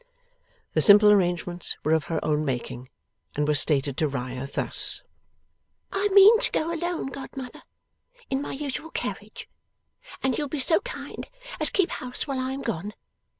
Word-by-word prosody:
The - - +2
simple 210 0 +7
arrangements 175 -3 0
were 155 - 0
of 160 -1 +1
her 165 -1 -2
own 150 0 0
making, 125 -2 -5 0.5
and 150 0 -1
were 150 - +2
stated 140 -2 +3
to 155 - +1
Riah 130 -1 -5
thus: - - -2 0.9
'I 395 +1 +1
mean 405 +3 +7
to - - +5
go 330 +2 -1
alone, 345 +1 -3
godmother, 270 -2 -9 0.7
in 270 +1 -2
my - - -5
usual 290 +3 -5
carriage, - - -6 0.8
and 265 -1 +1
you'll 295 - -2
be 300 - -4
so 320 +5 +3
kind - - -8 0.3
as - - +7
keep 380 -3 0
house 250 0 -1
while 275 -3 -3
I 260 +1 -3
am 275 - -6
gone. 210 -1 -4
230 Hz, 160 wpm, -25 LUFS, -, 0.9 s, simple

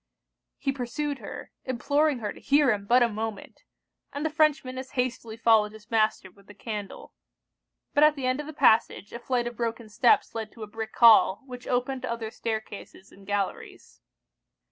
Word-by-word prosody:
He 275 - -1
pursued 275 +2 -4
her, - - -9
imploring 285 +3 +1
her 205 - -2
to - - -14
hear 285 -2 +3
him 200 -1 -3
but 245 +2 +5
a - - +4
moment; 220 -2 -6 0.5
and 285 +2 -4
the 315 - 0
Frenchman 295 -5 +1
as 260 0 -9
hastily 235 -3 -3
followed 220 -2 +3
his 220 +1 -15
master 215 -4 +1
with 200 +2 -23
the 205 - -14
candle. 210 -2 -7 0.8
But 290 - +4
at 300 0 +5
the 270 -3 -4
end 255 +2 0
of 295 - -5
the - - -6
passage, 220 -7 +2
a 235 - -6
flight 245 -1 -1
of 240 0 -5
broken 230 -1 -3
steps 235 +3 +3
led 220 -1 -5
to 225 - -9
a - - -7
brick 220 +1 -7
hall, 225 -2 +6
which 250 -1 -10
opened 255 +1 -1
to 255 -1 -4
other 230 -2 -4
stair 220 -1 -3
cases 200 -2 -12
and 195 -1 -17
galleries. 200 -1 -4
235 Hz, 190 wpm, -27 LUFS, 215-265 Hz, 0.8 s, hall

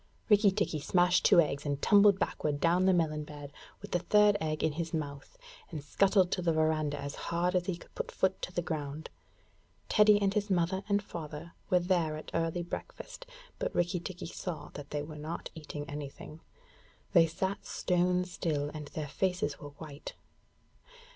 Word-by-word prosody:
Rikki 210 -1 +6
tikki 190 -5 -1
smashed 180 +4 +3
two - - +7
eggs, 145 -3 +2
and 145 -2 -2
tumbled 205 +1 +6
backward 150 -7 -1
down 175 +3 +3
the - - +6
melon 155 -3 +1
bed 145 -1 -10 0.3
with - - -8
the 175 - +2
third 210 +3 +4
egg 155 -1 -1
in 160 - +2
his 165 +2 -3
mouth, 145 - -6 0.3
and 150 -3 -6
scuttled 190 +4 +3
to - - 0
the 170 -1 +2
verandah 155 -2 +1
as 140 0 -5 0.2
hard 175 +2 +1
as 180 -1 +1
he 185 -3 -1
could - - -17
put - - -4
foot 190 0 0
to - - -4
the 175 -1 -2
ground. 150 -1 -4 0.8
Teddy 210 -1 +6
and 200 -1 +1
his 205 0 0
mother 185 +1 +1
and 200 0 +2
father 165 -2 -7 0.2
were 180 - +5
there 175 -4 +1
at 155 - -9
early 165 +1 0
breakfast; - - -8 0.3
but - - -2
Rikki 175 +1 +1
tikki 180 +1 -7
saw 165 -3 -6
that 145 -1 -8
they 145 -1 -2
were 150 0 -8
not 155 +3 -5
eating 150 -2 -7
anything. 145 +2 -8 0.7
They 170 -3 +7
sat 190 +5 -3
stone 180 0 +1
still, 150 -5 -2
and 150 -2 -6
their 150 0 -5
faces 180 0 -1
were 145 - -8
white. 145 0 -9
170 Hz, 180 wpm, -31 LUFS, 150-185 Hz, 0.8 s, two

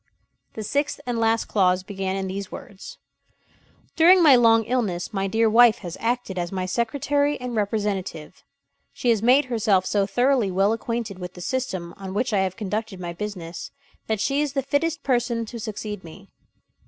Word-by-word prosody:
The 220 - -6
sixth 285 +7 -1
and 245 -2 -2
last 225 0 +2
clause 185 -2 +2
began 190 -1 -3
in 195 0 -2
these 190 +1 -5
words: 195 - -10 1.0
"During 350 +2 +6
my 290 -5 +8
long 230 -2 +5
illness, 215 -6 -2
my 195 -1 -1
dear 225 +3 +2
wife 230 0 +6
has 170 - -5
acted 230 -5 -2
as 175 0 -3
my 185 -1 -2
secretary 285 +8 0
and 250 -1 -5
representative. 205 -6 -3 0.5
She 245 - +1
has 220 -3 +1
made 255 +5 +5
herself 215 -6 +1
so 200 0 +1
thoroughly 245 +1 +2
well 195 +3 +2
acquainted 230 -3 -4
with 180 0 -7
the 180 - -9
system 185 -6 -3
on 195 -1 -7
which 240 +2 0
I 200 - +3
have 190 -1 -1
conducted 215 -1 -4
my 175 -1 -5
business, 180 -3 -6 0.4
that 220 -2 -1
she 275 +6 +1
is 295 -2 -2
the 275 -2 -1
fittest 305 +4 -1
person 240 -3 0
to 235 +2 -8
succeed 210 -2 -6
me. 165 -2 -13
220 Hz, 180 wpm, -24 LUFS, 190-245 Hz, 1.0 s, my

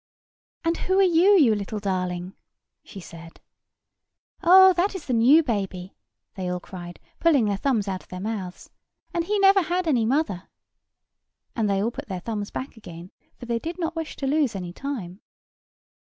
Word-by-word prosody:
"And 330 0 0
who 375 +1 0
are 390 - +6
you, 370 +3 +5
you 260 -10 +5
little 205 +1 -4
darling?" 180 -2 -3 0.5
she 200 - -11
said. 165 -2 -12 1.0
"Oh, 375 +1 +8
that 370 +3 0
is 360 - -7
the 255 - -2
new 260 +8 +5
baby!" 195 -7 -4 0.4
they 185 -2 -4
all 180 0 -2
cried, 175 -1 -10 0.2
pulling 295 -9 +3
their 205 -1 0
thumbs 225 -3 0
out 190 -2 -3
of - - -23
their 185 - -7
mouths; 195 -3 -6 0.4
"and 340 -1 -1
he 420 +3 0
never 390 0 +5
had 350 +1 -2
any 240 -7 +2
mother," 235 - -1 1.1
and 220 -3 0
they 195 0 +1
all 230 - 0
put - - -8
their 190 -3 -4
thumbs 205 +1 -4
back 260 0 -6
again, 175 -5 -11 0.3
for - - -10
they 235 -1 -1
did 330 +8 -6
not 335 -1 -3
wish 325 -1 -5
to 275 - -5
lose 280 -4 +1
any 180 -2 -6
time. 210 -8 -6
230 Hz, 180 wpm, -24 LUFS, -, 1.1 s, Oh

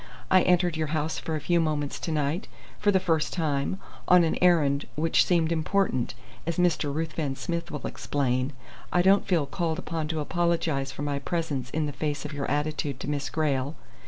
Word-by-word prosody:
I 185 -1 +7
entered 180 -2 +3
your 160 -1 -1
house 155 +1 -1
for 160 - -3
a - - -1
few 175 +4 +2
moments 150 -3 -1
to 165 - -3
night, 150 +4 -1 0.3
for 205 - +2
the 190 -2 +5
first 165 -4 0
time, 150 0 0 0.3
on 180 -1 +7
an 165 - +1
errand 150 -6 +3
which 160 +2 +3
seemed 170 -2 +2
important, 165 -5 0 0.3
as 170 - -1
Mr. 170 -5 +2
Ruthven 155 -2 -2
Smith 170 +3 -3
will 150 - -5
explain. 130 -1 -1 0.4
I 180 - +3
don't 195 +2 +4
feel 170 -6 +2
called 160 +2 -2
upon 160 -1 -3
to 160 0 -2
apologize 165 -4 0
for 145 - -6
my 145 -1 -1
presence 140 -4 -2
in 155 +3 -1
the 145 - -2
face 150 0 -2
of 150 - -5
your 140 -1 -3
attitude 145 -2 -1
to - - -5
Miss 145 -1 -2
Grayle. 145 0 0
155 Hz, 190 wpm, -27 LUFS, 145-170 Hz, 0.4 s, I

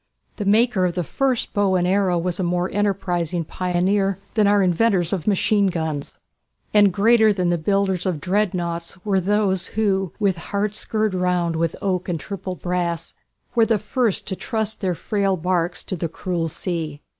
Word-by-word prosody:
The 205 - -3
maker 215 -1 +3
of 175 - -4
the 180 - 0
first 260 - -1
bow 200 -2 +2
and 180 -1 +2
arrow 185 -1 +2
was 175 +1 -2
a - - 0
more 180 +1 0
enterprising 180 -4 0
pioneer 185 +3 0 0.2
than 215 -2 +3
our 205 -1 +4
inventors 180 -1 +2
of 185 -2 -3
machine 205 0 +3
guns. 160 -5 -3 0.6
And 205 -2 +6
greater 220 +3 +4
than 180 -3 0
the 175 - +2
builders 190 +1 0
of 175 -5 -1
"Dreadnoughts" 175 -2 -1
were 195 -2 +2
those 195 -1 +1
who 195 -4 +1
"with 195 -4 +1
hearts 205 +1 -2
girt 215 -2 0
round 180 -2 0
with 165 0 0
oak 185 -2 -1
and 170 -2 -1
triple 190 +1 -5
brass" 175 -2 -2 0.4
were 230 -2 +4
the 225 - +3
first 215 +1 -1
to 190 - -2
trust 220 0 -3
their 185 -3 0
frail 195 0 0
barques 175 0 -1
to 185 - -4
"the 170 -1 -3
cruel 170 -1 -2
sea." 160 -3 -4
185 Hz, 175 wpm, -22 LUFS, 175-205 Hz, 0.6 s, And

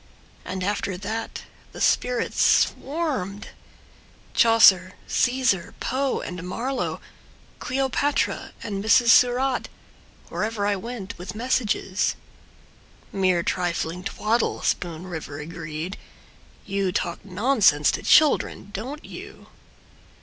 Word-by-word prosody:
And 185 0 -4
after 200 -1 -1
that 220 +4 -5 0.3
the - - -9
spirits 250 -1 +1
swarmed— 265 - 0 0.8
Chaucer, 195 -5 +6
Caesar, 245 -8 +1
Poe 265 +2 -1
and 180 -1 -6
Marlowe, 235 +9 -3 0.6
Cleopatra 270 +3 -1
and 200 -3 -4
Mrs. 230 +2 +5
Surratt— 250 +2 +4 0.6
Wherever 215 -1 -2
I 205 0 +2
went, 225 0 -6
with 185 +2 -7
messages,— 220 -4 0 1.0
Mere 185 -3 +2
trifling 175 0 -2
twaddle, 220 +2 -1
Spoon 170 -1 -2
River 160 -5 -6
agreed. 160 +2 -6 0.7
You 195 -1 -1
talk 170 -1 -3
nonsense 200 - +3
to - - -3
children, 295 -9 +3
don't 265 +9 -6
you? - - -11
205 Hz, 100 wpm, -24 LUFS, 180-245 Hz, 1.0 s, Chaucer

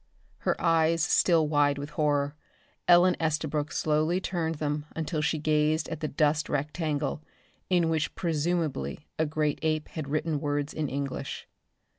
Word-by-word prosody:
Her - - 0
eyes 165 -1 +3
still 160 +1 +4
wide 145 -1 +2
with 145 +1 -6
horror. 145 -1 +1 0.5
Ellen 180 +1 +6
Estabrook 155 -1 -1
slowly 155 +3 +1
turned 170 -4 -2
them 150 0 -2
until 160 -1 -2
she 150 +1 +1
gazed 155 +1 +1
at 160 - -4
the 155 - -2
dust 150 0 +1
rectangle 150 0 -1 0.5
in 175 -3 +3
which 160 -4 -1
presumably 155 - -1
a 160 - +2
great 150 -1 0
ape 155 -1 0
had 155 -4 -5
written 155 0 0
words 145 0 -1
in 150 -3 -2
English. 140 -1 -4
155 Hz, 145 wpm, -28 LUFS, 145-160 Hz, 0.5 s, Ellen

